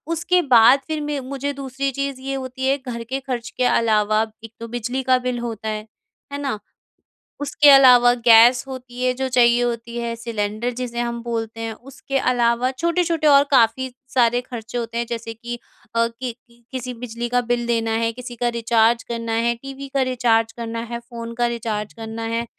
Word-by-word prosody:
उसके 355 +2 +2
बाद 255 -1 +6
फिर 310 -1 -2
मैं 295 -1 -2
मुझे 275 +2 -4
दूसरी 275 0 -3
चीज़ 275 0 -3
ये 270 +1 -4
होती 260 0 -4
है 275 +1 +2
घर 245 -3 -6
के 260 +4 -4
खर्च 250 -4 -4
के 255 - +1
अलावा 215 -2 +2 0.2
एक 225 0 -10
तो 230 - -6
बिजली 240 +3 -3
का 255 0 +4
बिल 250 -1 -2
होता 225 -2 -4
है, 215 0 -4 0.5
है - - -2
ना? 265 -7 -2 0.8
उसके 290 0 +4
अलावा 250 -3 +8
गैस 235 +2 +7
होती 250 -1 -7
है 255 0 +2
जो 265 +1 -2
चाहिए 240 -1 +4
होती 235 0 -3
है, 235 -1 -3
सिलेंडर 225 0 -3
जिसे 240 -1 -4
हम 235 0 -2
बोलते 225 -1 -4
हैं। 225 -1 -3
उसके 275 +2 -5
अलावा 245 0 +2
छोटे-छोटे 335 +1 0
और 280 -1 +7
काफ़ी 255 +1 +3 0.2
सारे 245 -1 +3
खर्चे 240 -1 -7
होते 230 0 -4
हैं 235 - 0
जैसे 230 -1 -5
कि 240 +1 -7 0.4
अ, 230 0 +3
कि 235 +1 -6 0.4
किसी 250 -1 -4
बिजली 235 0 -5
का 245 0 +2
बिल 240 0 -1
देना 225 -1 0
है, 230 0 +1
किसी 250 0 -8
का 240 +1 -1
रिचार्ज 230 0 +2
करना 230 -1 -3
है, 235 +1 +1
टीवी 275 +2 -9
का 275 - +2
रिचार्ज 235 -3 +2
करना 230 -1 -5
है, 235 0 -4
फ़ोन 235 -1 -8
का 240 0 +1
रिचार्ज 220 -3 -3
करना 225 0 -7
है, 235 +1 -1
240 Hz, 190 wpm, -21 LUFS, 230-260 Hz, 0.8 s, अलावा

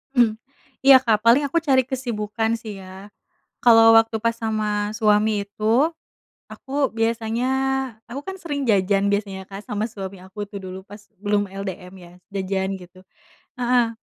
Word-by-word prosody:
Mmm. 235 -3 +4 0.5
Iya 275 -1 +10
Kak, 225 -4 +3
paling 240 +5 +6
aku 280 +4 -1
cari 270 -4 +3
kesibukan 230 -3 -2
sih 215 -3 -8
ya. 190 +2 -12 0.5
Kalau 225 -2 +7
waktu 225 0 +3
pas 230 - +3
sama 215 -2 -2
suami 210 -1 +2
itu, 225 +9 +1 0.6
aku 275 0 -2
biasanya 225 +1 0 0.6
aku 265 +4 -5
kan 385 0 -5
sering 290 -4 -3
jajan 195 0 +2
biasanya 200 -2 -2
Kak, 195 +1 -8
sama 210 +1 -2
suami 195 -3 -7
aku 190 +3 -16
tuh 200 - -6
dulu 185 0 -7
pas 205 +1 -11 0.2
belum 205 0 +1
LDM 190 -2 -7
ya, 175 - -15 0.2
jajan 190 0 -1
gitu. 180 +1 -15 0.6
Heeh. 240 -2 +2
215 Hz, 150 wpm, -22 LUFS, 200-235 Hz, 0.6 s, Iya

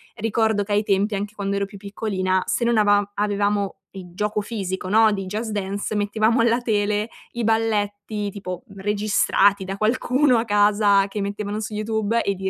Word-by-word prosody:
ricordo 220 -1 +1
che 205 +1 -3
ai 210 +1 +2
tempi, 205 +1 +1
anche 205 +2 -4
quando 200 -1 -3
ero 200 0 0
più 200 0 -12
piccolina 190 -2 -1
se 235 - -1
non 235 -1 +2
avam 205 -1 +3
avevamo 205 -1 0
il 185 -3 -10
gioco 210 +2 -1
fisico, 190 -4 -4
no, 220 +1 +5
di 195 -1 -3
Just 215 +4 -4
Dance, 200 +1 -3
mettevamo 215 +3 +2
alla 235 +1 +2
tele 210 -1 0 0.2
i 240 -1 -4
balletti 210 -2 -1
tipo, 185 -1 -7
mhmm, 195 -1 -12
registrati 205 -1 +2
da 195 +1 -5
qualcuno 250 +4 +2
a 225 - 0
casa 205 -1 +3
che 205 +1 -5
mettevano 205 +1 -3
su 215 0 -5
YouTube 220 +1 0
e 200 - 0
li 190 0 -3
205 Hz, 185 wpm, -22 LUFS, 200-220 Hz, 0.2 s, no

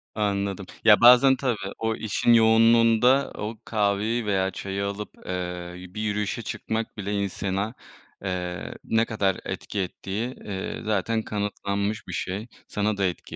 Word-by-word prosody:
Anladım. 100 -2 -1 0.2
Ya, 105 -2 +7
bazen 125 +3 +8
tabii 125 -3 -1 0.2
o 110 0 -1
işin 110 +2 +2
yoğunluğunda 115 +3 +5
o 110 +2 -5
kahveyi 105 +2 0
veya 95 -2 +1
çayı 100 +1 -3
alıp, 100 +1 -4 0.2
eee, 90 -1 -4
bir 105 +4 -6
yürüyüşe 105 +2 -1
çıkmak 110 0 -4
bile 100 0 -3
insana, 100 +1 -2 0.5
eee, 90 -4 -3
ne 115 0 +2
kadar 100 -5 0
etki 105 - -4
ettiği, 100 +6 -3
iii, 95 -2 -4
zaten 110 +1 0
kanıtlanmış 105 0 -2
bir - - -6
şey. 100 +5 -3 0.2
Sana 105 0 -1
da 100 - +1
etki 90 -3 -4
105 Hz, 140 wpm, -25 LUFS, 100-115 Hz, 0.5 s, bazen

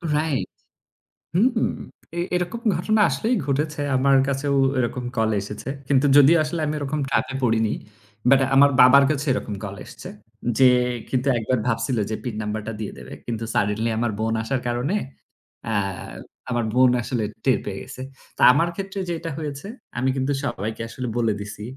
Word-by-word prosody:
Right. 150 -3 0 0.9
হুম, 230 +5 +3 0.5
এ - - 0 0.2
এরকম 180 +6 -2 0.2
ঘটনা 215 +5 +1
আসলেই 235 +3 0
ঘটেছে, 150 +2 -1
আমার 135 +1 +4
কাছেও 140 +1 0 0.2
এরকম 125 0 -1
call 110 0 +2
এসেছে। 105 +5 -7 0.2
কিন্তু 140 0 +3
যদিও 145 +4 +7
আসলে 160 +2 -3
আমি 150 - -1
এরকম 145 +1 -2
trap - - +2
এ - - -4
পড়িনি। 110 -2 +2 0.6
But 135 0 +6 0.2
আমার 140 +1 +7
বাবার 135 +2 +8
কাছে 145 -1 -2
এরকম 110 -4 -3
call 100 -1 -5
এসেছে, 180 - -10 0.5
যে, 130 -1 +7 0.4
কিন্তু 130 +1 -1
একবার 120 +2 0
ভাবছিল 115 +1 0
যে, 110 - -1
PIN 120 -4 -4
number 105 +1 -3
টা 115 - -3
দিয়ে 110 - -4
দেবে। - - -10
কিন্তু 115 -1 -4
suddenly 105 +3 +1
আমার 120 0 0
বোন 110 +1 0
আসার 130 +2 -2
কারণে 120 +10 -1 0.7
অ্যা 110 -2 0 0.7
আমার 120 -2 0
বোন 130 0 +5
আসলে 115 0 -2 0.2
টের 130 - +3
পেয়ে 95 -1 -4
গেছে। 130 - -9 0.4
তা - - -5
আমার 165 +5 +2
ক্ষেত্রে 195 +1 -5
যেটা 165 0 -3
হয়েছে, 145 +1 -5 0.3
আমি 130 +2 +1
কিন্তু 135 +2 -1
সবাইকে 110 -2 -4
আসলে 125 +2 -5
বলে 115 -3 +2
দিছি 105 0 -7
130 Hz, 170 wpm, -23 LUFS, 115-150 Hz, 0.9 s, বাবার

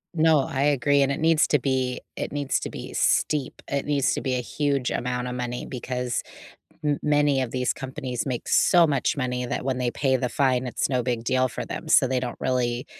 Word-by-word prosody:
No, 160 -1 +4
I 140 -1 -1
agree, 145 0 +3
and 135 - +1
it 140 - -2
needs 160 -1 +4
to 145 - +3
be 130 -1 -1
it - - -4
needs 145 -2 -1
to - - -4
be - - -8
steep, 145 -4 +1
it 140 -1 -2
needs 145 -3 +1
to - - -2
be 130 - -1
a 125 - -1
huge 140 0 -1
amount 125 0 -2
of 125 - -4
money 125 -1 -4
because 125 -1 -3 0.6
m 145 -1 +1
many 145 -2 +3
of 130 -3 -2
these 125 -1 0
companies 130 -2 -5
make 125 -3 -3
so 175 -2 +5
much 140 -1 0
money 125 -2 -2
that 120 - -3
when 130 -1 -1
they 125 -1 0
pay 130 +1 +1
the 125 0 -1
fine, 130 0 +1
it's 125 - -1
no 125 -2 +1
big 120 -1 -2
deal 130 +1 +2
for - - -5
them, - - -6
so - - +6
they 130 0 0
don't 125 -1 -5
really 125 0 -1
130 Hz, 220 wpm, -25 LUFS, 125-145 Hz, 0.6 s, so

